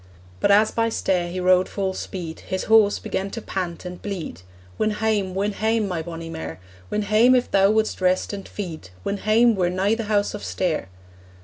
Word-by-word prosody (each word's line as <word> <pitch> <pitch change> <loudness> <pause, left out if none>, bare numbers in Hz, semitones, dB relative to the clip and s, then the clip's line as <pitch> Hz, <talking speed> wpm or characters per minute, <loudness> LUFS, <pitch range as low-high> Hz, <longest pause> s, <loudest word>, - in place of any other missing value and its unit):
But - - +2
as 210 +2 +5
by 230 0 +1
Stair 185 -5 0
he 180 +2 -4
rode 185 0 +3
full 195 -2 -2
speed 170 -4 -6
His 190 0 -4
horse 220 -2 +5
began 195 +1 -3
to 230 - -5
pant 180 -5 -4
and 180 0 -7
bleed; 180 - -5 0.4
'Win 215 - +2
hame, 210 -3 0
win 200 +2 0
hame, 220 +1 0
my 175 -4 -2
bonnie 165 0 -7
mare, 80 - -6 0.3
Win 210 - -1
hame 220 +5 +5
if 250 - +1
thou 195 0 +5
wouldst 215 -2 +1
rest 185 +2 +1
and 200 -1 -6
feed, 165 - -7
Win 200 - -2
hame, 225 +3 +4
we're 180 -4 +1
nigh 190 +4 +1
the 225 -1 -2
House 205 -1 +1
of 210 - -6
Stair!' 170 - -1
195 Hz, 200 wpm, -23 LUFS, 180-215 Hz, 0.4 s, as